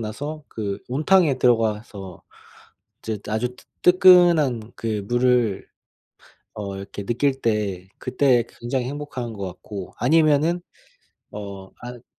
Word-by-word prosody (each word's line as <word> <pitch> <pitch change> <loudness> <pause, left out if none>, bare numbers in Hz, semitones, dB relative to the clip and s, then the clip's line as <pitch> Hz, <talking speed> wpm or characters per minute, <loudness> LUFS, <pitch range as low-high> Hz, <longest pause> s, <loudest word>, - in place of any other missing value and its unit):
나서 145 +8 -5
그 100 -3 -4
온탕에 155 +3 +3
들어가서 110 -6 0 0.8
이제 110 -2 -4
아주 115 +4 -2
뜨 - - -18 0.2
뜨끈한 175 - +5
그 110 -3 -3
물을 120 -4 +2 0.9
어 100 -2 -5
이렇게 100 +1 -7
느낄 135 +5 0
때 100 -6 -1
그때 125 -2 +2 0.2
굉장히 125 +2 -1
행복한 130 -4 -5
것 100 -2 -6
같고. 95 +1 -8
아니면은 155 +5 +3 0.7
어 100 -2 -8
아 120 0 -9
120 Hz, 220 characters per minute, -23 LUFS, 105-140 Hz, 0.9 s, 뜨끈한